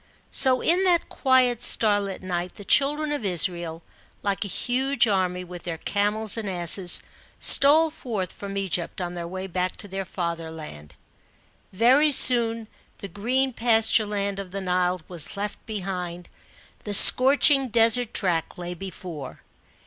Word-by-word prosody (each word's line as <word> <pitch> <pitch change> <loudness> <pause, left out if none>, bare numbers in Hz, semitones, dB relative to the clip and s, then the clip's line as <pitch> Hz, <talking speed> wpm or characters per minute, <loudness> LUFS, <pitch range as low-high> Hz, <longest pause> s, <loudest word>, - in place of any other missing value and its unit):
So 255 -1 +3
in 355 +3 +1
that 350 -2 +1
quiet 255 -3 +1
starlit 205 -5 0
night, 180 -1 -5
the 205 - -12
children 295 +4 +1
of 290 -5 -4
Israel, 175 -3 0 0.4
like 200 0 -2
a - - -5
huge 250 +4 -1
army, 185 -3 -1
with 175 -1 -10
their 170 -2 -6
camels 210 +4 -2
and 215 -3 -4
asses, 175 0 +4 0.4
stole 310 +3 +4
forth 210 - -6
from 200 -1 -8
Egypt, 185 -3 -3
on 175 -1 -5
their 170 -1 -7
way 185 +2 -7
back 180 0 -4
to 205 - -3
their 195 0 -5
fatherland. 160 - -7 0.8
Very 255 +9 +3
soon 230 -4 +3 0.3
the 200 - -8
green 255 +8 -2
pasture 225 -2 +2
land 200 -1 -4
of 195 -2 -8
the 195 +2 -6
Nile 180 -1 -1
was 175 0 -3
left 205 +1 -6
behind; 180 -4 -6 0.5
the 205 -1 0
scorching 270 +4 +6
desert 230 0 +2
track 170 -5 -2
lay 175 0 -6
before. 175 -6 -9
200 Hz, 145 wpm, -23 LUFS, 180-240 Hz, 0.8 s, scorching